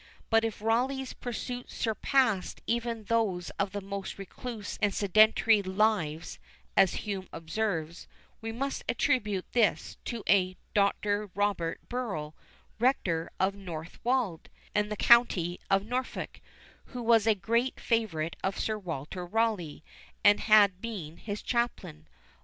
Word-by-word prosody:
But 225 Hz, 0 st, +5 dB
if 225 Hz, -2 st, -3 dB
Rawleigh's 255 Hz, +4 st, 0 dB
pursuits 245 Hz, +1 st, -6 dB
surpassed 225 Hz, -3 st, +1 dB
even 235 Hz, -1 st, -1 dB
those 200 Hz, -5 st, 0 dB
of 200 Hz, -1 st, 0 dB
the 205 Hz, -, -4 dB
most 195 Hz, 0 st, -5 dB
recluse 210 Hz, +2 st, -7 dB
and 205 Hz, -1 st, +3 dB
sedentary 215 Hz, +1 st, +5 dB
lives, 190 Hz, -5 st, 0 dB, 0.4 s
as 195 Hz, +2 st, +3 dB
Hume 195 Hz, -3 st, -4 dB
observes, 165 Hz, -1 st, -3 dB, 0.3 s
we 225 Hz, 0 st, -4 dB
must 275 Hz, +4 st, -3 dB
attribute 215 Hz, -8 st, +1 dB
this 230 Hz, -4 st, +1 dB
to 235 Hz, -3 st, -4 dB
a 185 Hz, -2 st, +3 dB, 0.2 s
"Dr. 205 Hz, 0 st, +1 dB
Robert 200 Hz, -5 st, -1 dB
Burrel, 200 Hz, -12 st, -3 dB, 0.5 s
Rector 175 Hz, -10 st, +1 dB
of 190 Hz, +1 st, +2 dB
Northwald, 190 Hz, +3 st, -3 dB, 0.2 s
in 210 Hz, 0 st, +1 dB
the 210 Hz, -, -4 dB
county 190 Hz, -8 st, +4 dB
of 195 Hz, +1 st, +3 dB
Norfolk, 250 Hz, +3 st, -4 dB, 0.4 s
who 245 Hz, -2 st, -7 dB
was 225 Hz, -2 st, +4 dB
a 220 Hz, -, +5 dB
great 230 Hz, +7 st, 0 dB
favourite 180 Hz, -9 st, 0 dB
of 195 Hz, -, -1 dB
Sir 215 Hz, -1 st, -1 dB
Walter 170 Hz, -1 st, -5 dB
Rawleigh, 180 Hz, -6 st, -1 dB, 0.4 s
and 205 Hz, 0 st, +6 dB
had 205 Hz, -4 st, +5 dB
been 180 Hz, -9 st, -6 dB
his 205 Hz, -1 st, -6 dB
chaplain. 235 Hz, -, -2 dB
205 Hz, 130 wpm, -29 LUFS, 185-230 Hz, 0.5 s, and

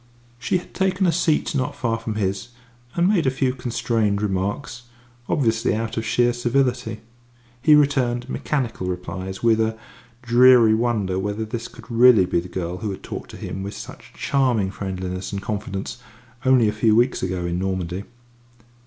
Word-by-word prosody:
She 180 Hz, -, +1 dB
had 180 Hz, -, -10 dB
taken 190 Hz, 0 st, +1 dB
a 175 Hz, -, +4 dB
seat 160 Hz, -1 st, +1 dB
not 130 Hz, -3 st, -1 dB
far 115 Hz, -2 st, -1 dB
from 115 Hz, -1 st, -4 dB
his, 95 Hz, -2 st, -2 dB, 0.5 s
and 175 Hz, +1 st, +3 dB
made 190 Hz, -8 st, +2 dB
a -, -, +6 dB
few 130 Hz, -1 st, 0 dB
constrained 115 Hz, -4 st, 0 dB
remarks, 105 Hz, +5 st, -3 dB, 0.4 s
obviously 115 Hz, -8 st, +1 dB
out 110 Hz, 0 st, -3 dB
of 110 Hz, -, -2 dB
sheer 120 Hz, +1 st, +2 dB
civility. 120 Hz, -2 st, 0 dB, 0.6 s
He 150 Hz, +3 st, +6 dB
returned 130 Hz, -4 st, +2 dB
mechanical 125 Hz, -9 st, -2 dB
replies, 90 Hz, +2 st, -5 dB
with 115 Hz, -1 st, +4 dB
a 110 Hz, 0 st, 0 dB, 0.5 s
dreary 120 Hz, -1 st, +6 dB
wonder 110 Hz, -5 st, 0 dB
whether 105 Hz, +3 st, -2 dB
this 115 Hz, +1 st, -5 dB
could 115 Hz, -, -14 dB
really 115 Hz, -4 st, +6 dB
be 90 Hz, -1 st, 0 dB
the 90 Hz, +2 st, -7 dB
girl 90 Hz, -1 st, -4 dB
who 105 Hz, +2 st, -4 dB
had 95 Hz, -, -6 dB
talked -, -, -7 dB
to -, -, -10 dB
him 95 Hz, -, -5 dB
with 100 Hz, +1 st, -5 dB
such -, -, -10 dB
charming 125 Hz, -8 st, +1 dB
friendliness 95 Hz, -1 st, -5 dB
and 100 Hz, -, -3 dB
confidence 100 Hz, -1 st, -4 dB, 0.5 s
only 130 Hz, -4 st, +5 dB
a 105 Hz, -, 0 dB
few 110 Hz, 0 st, +3 dB
weeks 120 Hz, +3 st, +2 dB
ago 90 Hz, -1 st, -2 dB
in 85 Hz, 0 st, -2 dB
Normandy. 95 Hz, 0 st, -3 dB
115 Hz, 170 wpm, -22 LUFS, 95-125 Hz, 0.6 s, a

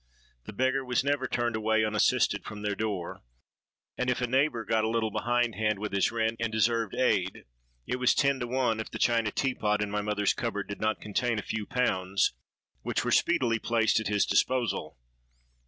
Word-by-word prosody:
The -, -, -8 dB
beggar 130 Hz, +4 st, +1 dB
was 125 Hz, -1 st, 0 dB
never 140 Hz, -1 st, 0 dB
turned 120 Hz, -2 st, -1 dB
away 110 Hz, 0 st, +2 dB
unassisted 105 Hz, -1 st, +2 dB
from 105 Hz, -1 st, -8 dB
their 105 Hz, -1 st, 0 dB
door; 100 Hz, -5 st, -4 dB, 0.8 s
and 125 Hz, -, 0 dB
if 125 Hz, -, 0 dB
a 125 Hz, -, +1 dB
neighbour 130 Hz, -2 st, +1 dB
got 110 Hz, -1 st, +1 dB
a 110 Hz, -, +1 dB
little 110 Hz, -1 st, 0 dB
behind 120 Hz, +1 st, 0 dB
hand 110 Hz, -1 st, 0 dB
with 105 Hz, +1 st, -4 dB
his 100 Hz, +1 st, +1 dB
rent, 115 Hz, 0 st, -1 dB
and 115 Hz, -1 st, -1 dB
deserved 115 Hz, 0 st, +1 dB
aid, 95 Hz, -7 st, 0 dB, 0.4 s
it 125 Hz, -, -2 dB
was 125 Hz, -1 st, +3 dB
ten 140 Hz, -1 st, +2 dB
to 120 Hz, -, -3 dB
one 125 Hz, -3 st, 0 dB
if 110 Hz, -, -4 dB
the -, -, -6 dB
china 115 Hz, -2 st, +2 dB
tea 135 Hz, +3 st, 0 dB
pot 105 Hz, -3 st, 0 dB
in 105 Hz, -1 st, -2 dB
my 105 Hz, 0 st, -1 dB
mother's 105 Hz, -1 st, +1 dB
cupboard 110 Hz, -4 st, -3 dB
did 100 Hz, -, -7 dB
not 110 Hz, 0 st, 0 dB
contain 115 Hz, +3 st, -1 dB
a 105 Hz, -, -3 dB
few 110 Hz, -2 st, -4 dB
pounds, 95 Hz, -, +1 dB, 0.5 s
which -, -, -2 dB
were -, -, 0 dB
speedily 115 Hz, -3 st, +2 dB
placed 115 Hz, -1 st, +2 dB
at 110 Hz, -, -3 dB
his 105 Hz, 0 st, +2 dB
disposal. 125 Hz, -, 0 dB
110 Hz, 200 wpm, -28 LUFS, 105-125 Hz, 0.8 s, was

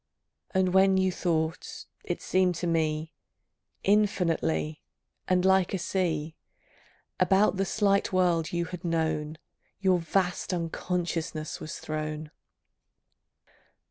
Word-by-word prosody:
And 185 Hz, -1 st, +1 dB
when 190 Hz, 0 st, +5 dB
you 190 Hz, 0 st, +2 dB
thought, 165 Hz, -2 st, -2 dB, 0.2 s
it -, -, -4 dB
seemed 185 Hz, -1 st, +2 dB
to 170 Hz, -, -3 dB
me, 160 Hz, -1 st, 0 dB, 0.7 s
Infinitely, 180 Hz, -6 st, +1 dB, 0.5 s
and 185 Hz, 0 st, +2 dB
like 190 Hz, 0 st, +3 dB
a -, -, 0 dB
sea, 165 Hz, -4 st, -1 dB, 0.8 s
About 195 Hz, 0 st, +3 dB
the 195 Hz, -, +1 dB
slight 200 Hz, -1 st, +1 dB
world 175 Hz, -3 st, +2 dB
you 170 Hz, 0 st, -1 dB
had 180 Hz, +1 st, -8 dB
known 160 Hz, -2 st, -1 dB, 0.4 s
Your 190 Hz, -2 st, +3 dB
vast 180 Hz, +2 st, 0 dB
unconsciousness 165 Hz, -2 st, -3 dB
was 155 Hz, -, -6 dB
thrown.... 155 Hz, 0 st, -4 dB
175 Hz, 110 wpm, -28 LUFS, 160-190 Hz, 0.8 s, when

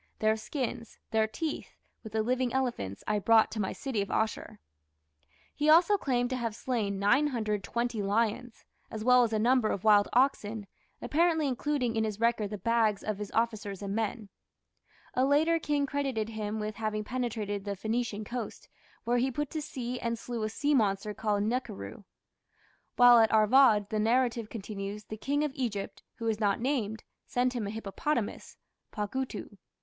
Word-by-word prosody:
Their 215 Hz, 0 st, +2 dB
skins, 235 Hz, 0 st, -5 dB
their 220 Hz, -1 st, +2 dB
teeth, 310 Hz, +8 st, -5 dB, 0.3 s
with 220 Hz, -2 st, -9 dB
the 220 Hz, -1 st, +1 dB
living 250 Hz, +1 st, 0 dB
elephants, 240 Hz, -, -2 dB
I 210 Hz, 0 st, +1 dB
brought 225 Hz, +2 st, +4 dB
to 220 Hz, -, -4 dB
my 190 Hz, -, -1 dB
city 260 Hz, -7 st, -3 dB
of 200 Hz, -, -4 dB
Asshur." 220 Hz, 0 st, -2 dB, 1.0 s
He 295 Hz, +1 st, +1 dB
also 340 Hz, +6 st, +6 dB
claimed 250 Hz, -8 st, 0 dB
to 255 Hz, -, 0 dB
have 230 Hz, -3 st, -3 dB
slain 220 Hz, -6 st, -2 dB
920 235 Hz, -1 st, 0 dB
lions, 225 Hz, +4 st, -1 dB, 0.2 s
as 215 Hz, -1 st, -5 dB
well 250 Hz, +1 st, +6 dB
as 230 Hz, -, 0 dB
a 220 Hz, -, +1 dB
number 240 Hz, 0 st, +3 dB
of 190 Hz, -, -2 dB
wild 205 Hz, -2 st, +5 dB
oxen, 225 Hz, -5 st, +1 dB, 0.4 s
apparently 320 Hz, -1 st, +2 dB
including 255 Hz, -2 st, -1 dB
in 220 Hz, -, +1 dB
his 215 Hz, -1 st, -3 dB
record 230 Hz, -3 st, +1 dB
the 210 Hz, -, -5 dB
"bags" 225 Hz, -2 st, +1 dB
of 215 Hz, -2 st, -3 dB
his 210 Hz, -1 st, -5 dB
officers 215 Hz, -4 st, -1 dB
and 200 Hz, 0 st, -3 dB
men. 220 Hz, -1 st, -2 dB, 0.8 s
A 255 Hz, -, +2 dB
later 310 Hz, +5 st, +3 dB
king 290 Hz, -2 st, 0 dB
credited 270 Hz, -6 st, -2 dB
him 215 Hz, -1 st, -4 dB
with 215 Hz, -1 st, -4 dB
having 215 Hz, -1 st, -2 dB
penetrated 215 Hz, -4 st, -3 dB
to 205 Hz, -, -6 dB
the 200 Hz, -, -2 dB
Phoenician 220 Hz, 0 st, -2 dB
coast, 235 Hz, +1 st, -6 dB, 0.3 s
where 240 Hz, +1 st, +1 dB
he 255 Hz, +2 st, +2 dB
put 295 Hz, +2 st, -3 dB
to 310 Hz, -, -3 dB
sea 250 Hz, -3 st, -5 dB
and 235 Hz, 0 st, -2 dB
slew 235 Hz, 0 st, -5 dB
a 215 Hz, -, -1 dB
sea 285 Hz, +6 st, 0 dB
monster 210 Hz, -4 st, +1 dB
called 205 Hz, -1 st, 0 dB
the -, -, 0 dB
"nakhiru". 205 Hz, -, -4 dB, 0.9 s
While 245 Hz, -1 st, +8 dB
at 225 Hz, -1 st, +4 dB
Arvad, 215 Hz, -1 st, +5 dB
the 215 Hz, -, 0 dB
narrative 230 Hz, 0 st, +1 dB
continues, 205 Hz, -1 st, -6 dB
the 215 Hz, -, -7 dB
King 285 Hz, +6 st, 0 dB
of 300 Hz, -, -1 dB
Egypt, 230 Hz, -8 st, -4 dB
who 230 Hz, -, -6 dB
is 220 Hz, -2 st, 0 dB
not 205 Hz, -3 st, +1 dB
named, 230 Hz, -4 st, -1 dB, 0.2 s
sent 250 Hz, +1 st, +1 dB
him 230 Hz, -5 st, -3 dB
a -, -, -3 dB
hippopotamus 220 Hz, +3 st, -3 dB, 0.3 s
(pagutu). 210 Hz, -1 st, -4 dB
225 Hz, 175 wpm, -30 LUFS, 210-255 Hz, 1.0 s, While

